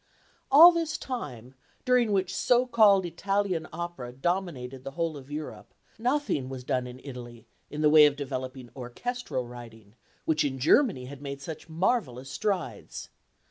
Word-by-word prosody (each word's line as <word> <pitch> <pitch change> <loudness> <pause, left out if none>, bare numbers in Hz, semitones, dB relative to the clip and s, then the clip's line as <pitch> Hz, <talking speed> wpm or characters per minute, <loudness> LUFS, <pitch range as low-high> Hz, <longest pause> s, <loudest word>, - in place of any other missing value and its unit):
All 325 +6 +10
this 330 -2 -2
time, 130 - -6 0.3
during 250 -3 +3
which 190 -2 0
so 245 +4 +3
called 215 -6 +5
Italian 185 -1 -1
opera 170 -7 -6
dominated 135 -4 -3
the - - -5
whole 165 -2 -1
of 140 -1 -11
Europe, 150 +1 -7 0.2
nothing 245 - 0
was 130 -1 -7
done 125 0 -1
in 125 +1 -10
Italy 120 -4 -9 0.2
in 150 - -5
the 150 - +5
way 150 -1 +9
of 145 - -1
developing 130 -3 -6
orchestral 130 - -4
writing, 115 -4 -12 0.3
which 160 -1 +2
in 135 -2 -2
Germany 155 - +3
had 140 +1 -10
made 140 -1 -6
such 160 +3 -8
marvellous 160 - -1
strides. 200 -5 -3
150 Hz, 150 wpm, -28 LUFS, 130-200 Hz, 0.3 s, All